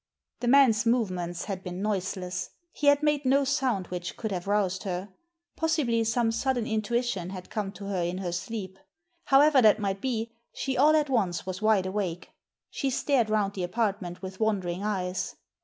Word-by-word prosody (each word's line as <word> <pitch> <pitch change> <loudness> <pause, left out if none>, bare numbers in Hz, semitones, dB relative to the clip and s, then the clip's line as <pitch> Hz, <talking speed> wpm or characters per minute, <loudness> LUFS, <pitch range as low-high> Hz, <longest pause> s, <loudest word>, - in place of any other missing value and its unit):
The 245 - -3
man's 240 -4 +5
movements 180 -8 0
had 190 -2 -5
been 180 -1 -5
noiseless. 190 -3 -2 0.2
He 290 - -2
had 285 +1 +5
made 295 -1 +2
no 275 +2 +3
sound 255 -8 0
which 180 0 -5
could 220 -2 -3
have 180 -1 -4
roused 195 -2 +1
her. 190 0 -4 0.5
Possibly 300 -8 +1
some 230 0 +1
sudden 245 0 0
intuition 220 -4 -1
had 185 -1 -8
come 205 -3 -2
to 200 - -9
her 195 -2 -1
in 175 +1 -2
her 185 -2 -3
sleep. 190 +1 -5 0.5
However 280 0 +6
that 215 -2 +6
might 195 -2 -2
be, 230 -3 -2 0.2
she 265 -1 -2
all 300 +4 +5
at 300 -3 +1
once 190 -9 0
was 185 +1 -5
wide 215 -3 +3
awake. 185 -3 -3 0.4
She 275 - -1
stared 260 -3 +1
round 210 -2 +1
the 190 - -4
apartment 195 -2 -2
with 190 0 -7
wondering 195 -5 0
eyes. 185 -3 -2
210 Hz, 175 wpm, -28 LUFS, 185-245 Hz, 0.5 s, However